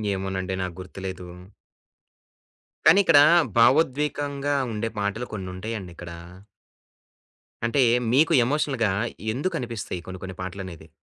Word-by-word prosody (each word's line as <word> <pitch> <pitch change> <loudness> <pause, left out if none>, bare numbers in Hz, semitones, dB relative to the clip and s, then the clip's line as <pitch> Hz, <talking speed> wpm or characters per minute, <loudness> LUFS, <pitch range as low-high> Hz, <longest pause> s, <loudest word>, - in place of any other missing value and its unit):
ఏమోనండి! 95 -1 -3
నాకు 90 -2 -4
గుర్తులేదు. 95 -1 -7 1.6
కానీ 195 - +7
ఇక్కడ 165 -5 +6 0.4
భావోద్వేగంగా 145 +2 +2 0.2
ఉండే 115 +2 -2
పాటలు 105 +4 -2
కొన్ని 95 -3 -5
ఉంటాయండిక్కడ. 90 -4 -7 1.5
అంటే, 125 +4 +2 0.3
మీకు 155 +5 +4
ఎమోషనల్‌గా 135 -6 0 0.4
ఎందుకనిపిస్తాయి 125 - -3
కొన్ని 95 0 -7
కొన్ని 95 0 -7
పాటలనేది. 90 -3 -7
105 Hz, 95 wpm, -25 LUFS, 95-140 Hz, 1.6 s, కానీ